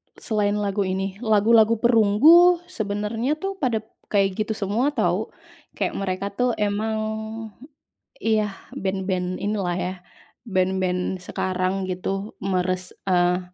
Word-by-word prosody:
Selain 210 -2 0
lagu 200 -1 -1
ini. 190 +1 -3
Lagu-lagu 220 0 +4
Perunggu, 250 - +6
sebenarnya, 215 - -2
tuh, 390 +4 -5
pada 235 -6 0 0.2
kayak 195 0 +1
gitu 220 - -1
semua, 210 +6 0
tahu. - - +1 0.5
Kayak - - -2
mereka, 195 0 -2
tuh, 245 +4 +1
emang, 210 +1 -1 1.2
iya, 215 -2 +1 0.2
band-band 185 -1 -2
inilah, 200 -3 -1
ya, 185 +1 -2 0.5
band-band 185 -3 -1
sekarang, 185 +1 -2
gitu, 195 +3 -4
meres 185 -1 -1 0.2
eee, 180 -1 +3
200 Hz, 110 wpm, -23 LUFS, 185-220 Hz, 1.2 s, Perunggu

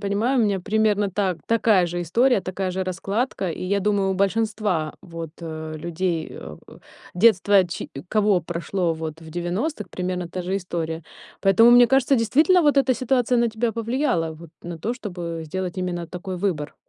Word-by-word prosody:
понимаю, 210 +6 0
у - - +4
меня 200 -3 +1
примерно 210 0 +1
та 190 -2 0
такая 215 -5 +3
же 175 +1 -3
история, 230 +7 +2
такая 185 +1 -3
же 190 +1 -2
раскладка. 195 +2 -2
И - - -6
я 200 +2 0
думаю, 200 -1 +1
у 190 - 0
большинства, 200 -5 0
вот, 165 -2 -7
э, 160 -1 -6
людей, 170 0 -2
а, 75 -1 -9 0.6
детство 200 -1 +4
ч 175 - -6 0.2
кого 210 -4 +3
прошло, 170 +1 -2
вот, 160 0 -6
в 160 - -11
90, 185 - -3
примерно 180 -1 -3
та 180 +2 -5
же 185 +2 -1
история. 165 -3 -4 0.4
Поэтому 205 +5 +6
мне 245 0 +8
кажется, 270 +2 +3
действительно 305 - +4
вот 290 -2 +4
эта 265 -1 +3
ситуация 250 -1 +1
на 235 - +3
тебя 225 +1 -1
повлияла, 230 - -1
вот 165 +1 -12
на 170 -1 -7
то, 230 +9 -2
чтобы 175 -8 -6
сделать 185 +3 -4
именно 175 -2 -3
такой 180 +2 -6
выбор. 165 -7 -2
190 Hz, 175 wpm, -23 LUFS, 175-220 Hz, 0.6 s, мне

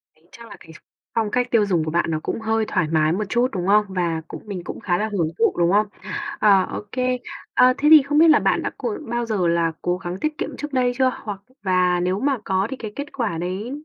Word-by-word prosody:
tính 155 - -31
chắc 235 0 -13
là 210 - -11
cái 160 - -15 0.4
phong 220 -2 0
cách 250 0 +1
tiêu 220 -3 +4
dùng 175 -5 +1
của 155 - -3
bạn 170 +1 +1
nó 155 - -1
cũng - - -3
hơi 220 0 0
thoải 185 -5 0
mái 155 -1 +3
một 215 +4 -1
chút, 240 +1 +2
đúng 180 -2 -3
không? 210 +1 +4
Và 170 -3 -1
cũng - - -9
mình 190 -4 -5
cũng - - -7
khá 175 -3 0
là 215 +3 -1
hưởng 170 -6 0
thụ, 230 - +3
đúng 170 +1 +3
không? 210 +1 +3 0.5
Ờ, 200 -3 +5
ô - - -4
kê. 255 0 -1 0.3
Ờ, 255 0 +5
thế 295 - +1
thì 310 -2 +10
không 295 +2 -1
biết 330 +1 +7
là - - +6
bạn - - +1
đã - - -2
cố 425 - -3
bao 240 0 -1
giờ 205 -6 0
là 170 -1 +1
cố 175 0 0
gắng 180 0 -6
tiết 305 0 -2
kiệm - - -5
trước 295 -1 -6
đây 250 -1 +2
chưa? 260 -1 +3
Hoặc 205 -3 -5 0.2
và 180 -2 +2
nếu 180 +2 0
mà 275 +1 +1
có 190 +1 0
thì 265 - -5
cái 215 -2 -7
kết 285 +1 -5
quả 220 -10 -2
đấy 185 +8 -4
205 Hz, 265 wpm, -22 LUFS, 180-245 Hz, 0.5 s, thì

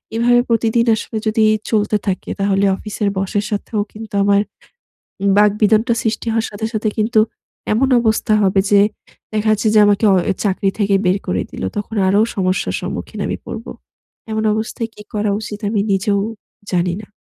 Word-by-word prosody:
এভাবে 240 +1 +4
প্রতিদিন 230 0 +2
আসলে 220 0 -5
যদি 220 +1 +2 0.3
চলতে 210 -1 +2
থাকে 190 -1 -2
তাহলে 200 0 +2
অফিসের 210 0 -2
বসের 200 +2 -1
সাথেও 210 +1 -2
কিন্তু 220 0 -10
আমার 200 0 +4 0.8
উম 200 - +3
বাকবিতণ্ডা 215 +3 +3
সৃষ্টি 220 +1 -2
হওয়ার 225 0 0
সাথে, 210 +1 -4
সাথে 215 0 0
কিন্তু 220 +1 +3 0.5
এমন 255 +5 +2
অবস্থা 220 -1 +1
হবে 195 0 +3
যে 200 -1 +6 0.5
দেখা 215 0 0
যাচ্ছে 215 +1 +1
যে - - +6
আমাকে 205 +1 +2
অ - - +4 0.3
চাকরি 195 -1 +1
থেকে 200 -2 +2
বের 185 +2 +3
করে 90 0 0
দিলো - - -4
তখন 210 +2 -4
আরো 200 +2 +3 0.2
সমস্যার 185 -1 0
সম্মুখীন - - -6
আমি - - -2
পড়ব। 225 0 -7 0.6
এমন 220 0 -1
অবস্থায় 225 +1 -3
কী 210 - -11
করা 210 0 0
উচিত 210 -1 -6
আমি 210 -1 0
নিজেও 200 +1 +1 0.5
জানি 175 -1 +1
না। 205 - -14
210 Hz, 165 wpm, -18 LUFS, 200-220 Hz, 0.8 s, যে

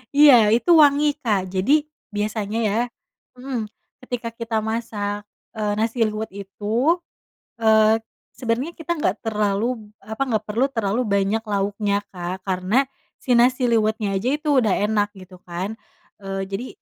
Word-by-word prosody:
Iya 255 -8 +7
itu 295 +9 +2
wangi 295 0 +5
Kak, 195 -6 0
jadi 240 +12 +3 0.3
biasanya 210 +1 -2
ya 210 0 +1 0.6
mhm, 250 -4 -4 0.4
ketika 245 -2 -4
kita 230 -1 -2
masak, 210 -2 -3 0.3
eee, 210 -1 0
nasi 225 +1 +1
liwet 215 +1 -3
itu, 215 - 0 0.6
eee, 220 0 +5 0.4
sebenarnya 250 +6 -1
kita 330 +1 -2
enggak 215 -9 0
terlalu, 210 0 0
b - - -12 0.2
apa 220 +3 -6
enggak 220 -3 -1
perlu 235 +5 +2
terlalu 225 -1 0
banyak 200 +2 +1
lauknya, 200 0 0
Kak, 185 +2 -5
karena 190 +8 +1 0.3
si 255 - 0
nasi 250 +2 +4
liwetnya 215 -2 +1
aja 205 +6 0
itu 300 +1 -2 0.2
udah 210 - +2
enak 210 -1 +1
gitu 185 0 -13
kan, 185 +5 -4 0.5
eee, 195 0 -3
jadi 200 +6 -4
220 Hz, 145 wpm, -22 LUFS, 200-240 Hz, 0.6 s, Iya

